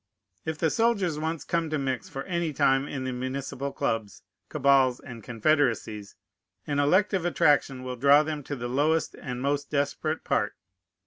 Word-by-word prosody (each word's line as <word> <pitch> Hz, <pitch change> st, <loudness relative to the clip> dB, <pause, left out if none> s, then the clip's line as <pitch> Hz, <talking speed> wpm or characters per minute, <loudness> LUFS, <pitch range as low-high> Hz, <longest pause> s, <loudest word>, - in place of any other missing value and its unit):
If 160 Hz, -1 st, -3 dB
the 160 Hz, 0 st, +1 dB
soldiers 200 Hz, -9 st, +1 dB
once 160 Hz, -1 st, -3 dB
come 165 Hz, +1 st, -1 dB
to 155 Hz, -, -1 dB
mix 135 Hz, -2 st, -3 dB
for 135 Hz, -, -5 dB
any 170 Hz, -4 st, -2 dB
time 135 Hz, +1 st, +2 dB
in 135 Hz, -3 st, -4 dB
the 130 Hz, -, -2 dB
municipal 130 Hz, +2 st, -4 dB
clubs, 115 Hz, -6 st, -3 dB, 0.3 s
cabals, 135 Hz, -2 st, +3 dB
and 120 Hz, -5 st, -10 dB
confederacies, 115 Hz, -4 st, 0 dB, 0.5 s
an 145 Hz, -1 st, -1 dB
elective 185 Hz, +5 st, +3 dB
attraction 145 Hz, -6 st, +2 dB
will 125 Hz, -1 st, -5 dB
draw 140 Hz, +4 st, +6 dB
them 155 Hz, -1 st, -4 dB
to 145 Hz, -, -4 dB
the 120 Hz, -2 st, -4 dB
lowest 150 Hz, +6 st, +1 dB
and 125 Hz, 0 st, -6 dB
most 145 Hz, 0 st, -1 dB
desperate 145 Hz, +2 st, -1 dB
part. -, -, 0 dB
140 Hz, 165 wpm, -27 LUFS, 130-155 Hz, 0.5 s, draw